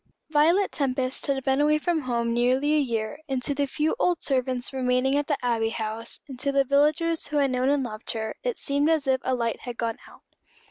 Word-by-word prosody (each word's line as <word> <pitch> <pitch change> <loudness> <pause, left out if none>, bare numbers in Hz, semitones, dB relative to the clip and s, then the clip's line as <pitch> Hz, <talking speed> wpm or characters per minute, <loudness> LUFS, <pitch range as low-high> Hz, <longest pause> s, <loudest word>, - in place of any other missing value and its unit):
Violet 330 +6 +3
Tempest 260 -2 -1
had 270 -1 0
been 270 +1 +2
away 300 +1 +4
from 325 +1 0
home 235 -3 -1
nearly 255 +5 +2
a 305 - +4
year, 235 0 -2
and 260 -2 -1
to 285 - +1
the 285 0 0
few 300 - 0
old 355 -7 +1
servants 255 -1 0
remaining 255 +1 +1
at 290 0 0
the 290 - 0
Abbey 225 -2 +1
House, 225 +1 -3
and 265 -3 -9
to 280 +2 0
the 275 0 +3
villagers 305 +4 +1
who 300 - -2
had 275 -2 +2
known 255 +1 +1
and 285 -1 +2
loved 215 -2 -6
her, 220 -1 -3
it - - -2
seemed 285 +2 +1
as 315 -3 +2
if 265 -1 +1
a 260 - 0
light 230 -2 -2
had 245 -2 -7
gone 230 -1 -2
out. - - -17
270 Hz, 225 wpm, -25 LUFS, 245-295 Hz, -, away